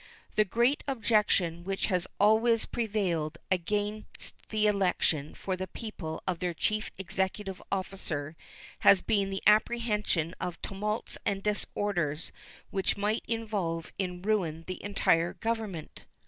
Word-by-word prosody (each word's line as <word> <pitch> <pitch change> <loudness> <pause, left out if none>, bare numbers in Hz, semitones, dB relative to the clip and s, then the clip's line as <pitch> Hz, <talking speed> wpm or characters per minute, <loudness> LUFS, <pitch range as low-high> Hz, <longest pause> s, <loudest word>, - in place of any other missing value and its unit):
The 215 - +5
great 240 +8 +2
objection 210 -9 +2
which 195 +1 -1
has 180 -3 0
always 220 +2 +5
prevailed 185 -9 -1
against 205 +4 -1 0.2
the 215 -1 +2
election 180 -7 +2
by 190 - +1
the 185 0 -3
people 180 -9 -6
of 180 -3 -1
their 175 -2 -1
chief 215 +6 0
executive 190 +1 -2
officer 175 -6 -2 0.4
has 195 -2 +6
been 200 -2 +2
the 195 0 -3
apprehension 210 -6 +3
of 175 -1 -3
tumults 210 +3 -2
and 195 -1 -1
disorders 185 -7 -1 0.4
which 195 0 0
might 210 +2 0
involve 205 -8 -2
in 180 -2 -2
ruin 180 -7 +1
the 185 +1 -5
entire 175 -4 +2
Government. 220 -8 -3
195 Hz, 125 wpm, -30 LUFS, 175-215 Hz, 0.4 s, has